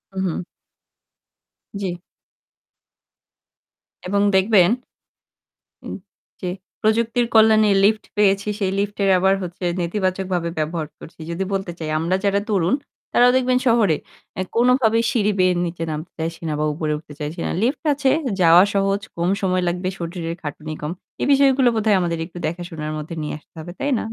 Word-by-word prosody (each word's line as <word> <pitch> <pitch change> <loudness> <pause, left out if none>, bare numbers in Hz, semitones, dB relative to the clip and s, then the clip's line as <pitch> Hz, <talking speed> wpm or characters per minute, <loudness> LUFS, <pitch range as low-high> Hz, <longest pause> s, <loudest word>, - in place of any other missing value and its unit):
উহু। 185 -2 -2 1.4
জ্বী। 180 -3 -3 2.1
এবং 200 +1 +1
দেখবেন 190 -2 +5 1.2
উ - - -6 0.5
যে 180 - -2 0.3
প্রযুক্তির 230 +2 +2
কল্যাণে 220 -1 +6
লিফট 215 +1 +3
পেয়েছি, 200 0 +3
সেই 190 -2 0
লিফটের 200 -1 0
আবার 190 +1 +3
হচ্ছে 180 +1 -8 0.2
নেতিবাচকভাবে 185 -1 -1
ব্যবহার 155 0 -2
করছি। 165 - -13
যদি 180 +3 -2
বলতে 195 -2 -2
চাই 155 -1 -4
আমরা 170 +3 0
যারা 200 0 +3
তরুণ; 190 +2 +2 0.4
তারাও 245 +1 +6
দেখবেন 255 0 +2
শহরে 215 -9 +3 0.4
অ্যা 185 - -2
কোনভাবেই 235 -2 +3
সিঁড়ি 210 -3 +2
বেয়ে 185 0 +4
নিচে 165 -1 -4
নামতে 155 +3 -6
চাইছি 165 +1 -4
না - - -1
বা 155 - +1
উপরে 155 0 -2
উঠতে 150 -1 -12
চাইছি 150 +2 -5
না। - - -1
লিফট 255 +8 0
আছে, 275 -1 +1 0.3
যাওয়া 170 +2 +7
সহজ। 195 0 +1 0.2
কম 170 +2 +1
সময় 185 -1 +1
লাগবে, 180 +1 -1
শরীরের 170 -1 -4
খাটুনি 155 +1 -6
কম। 150 +2 -3 0.3
এ - - +1
বিষয়গুলো 270 -2 +4
বোধয় 215 -2 +3
আমাদের 170 -1 -1
একটু 175 0 -12
দেখাশোনার 165 -2 -5
মধ্যে 155 +2 -6
নিয়ে 150 - -4
আসতে - - -36
হবে। 175 +2 -7
তাই 285 - -1
না? - - -3
185 Hz, 150 wpm, -21 LUFS, 170-215 Hz, 2.1 s, যাওয়া